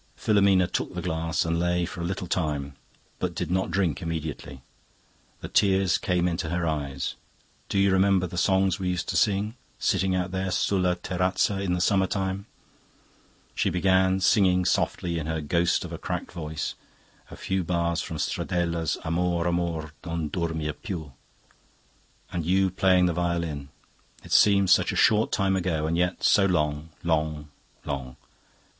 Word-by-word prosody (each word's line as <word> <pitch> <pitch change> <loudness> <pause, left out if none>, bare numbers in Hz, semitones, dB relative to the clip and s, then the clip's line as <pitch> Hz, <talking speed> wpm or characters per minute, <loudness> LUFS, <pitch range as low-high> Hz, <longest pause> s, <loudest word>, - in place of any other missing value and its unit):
"Filomena 100 -2 +3
took 90 - -3
the - - -3
glass 80 -1 -1
and 85 0 0
lay 90 0 +1
for 85 - -7
a - - -2
little 95 +1 -3
time, 75 -5 -2 0.4
but 90 -2 -2
did 90 -1 -3
not 95 +1 0
drink 95 -4 0
immediately. 80 -5 -5 0.8
The - - -5
tears 95 -2 +3
came 90 -1 +1
into 85 -2 -2
her 85 +1 -1
eyes. 70 -4 -2 0.6
'Do - - -1
you 100 0 +4
remember 95 -1 +3
the 90 - -7
songs 95 0 +2
we 95 -1 -1
used 90 -1 -2
to - - -2
sing, 105 +1 +2 0.2
sitting 95 -1 +1
out 90 0 -1
there 95 0 -2
sulla 90 -1 +1
terrazza 90 +2 0
in 95 -3 0
the 90 - 0
summer 95 0 +3
time?' 95 +1 -3 1.1
She - - +1
began 95 +1 +2
singing 90 -2 +3
softly 85 -1 0
in 75 - -5
her 80 0 -1
ghost 85 +3 +1
of - - -8
a - - -6
cracked - - -4
voice 80 -3 -4 0.6
a - - -9
few 95 -1 -2
bars 85 0 0
from 80 - -5
Stradella's 85 +1 -1
'Amor 85 +1 0
amor, 85 -3 -1
non 85 -3 -3
dormir 80 -2 -2
piu.' 80 - -7 1.2
'And 85 - -2
you 95 +3 +2
playing 95 0 +3
on - - +5
the 90 - +1
violin, 85 -4 -2 0.5
it - - -13
seems 100 -2 +5
such - - +4
a - - -4
short 110 +1 +3
time 95 0 +1
ago, 85 -4 -1
and 80 +1 0
yet 90 +1 0
so 100 -1 +5
long, 75 -3 0
long, 75 -2 -1 0.4
long. 65 -2 -4
90 Hz, 165 wpm, -26 LUFS, 80-95 Hz, 1.2 s, on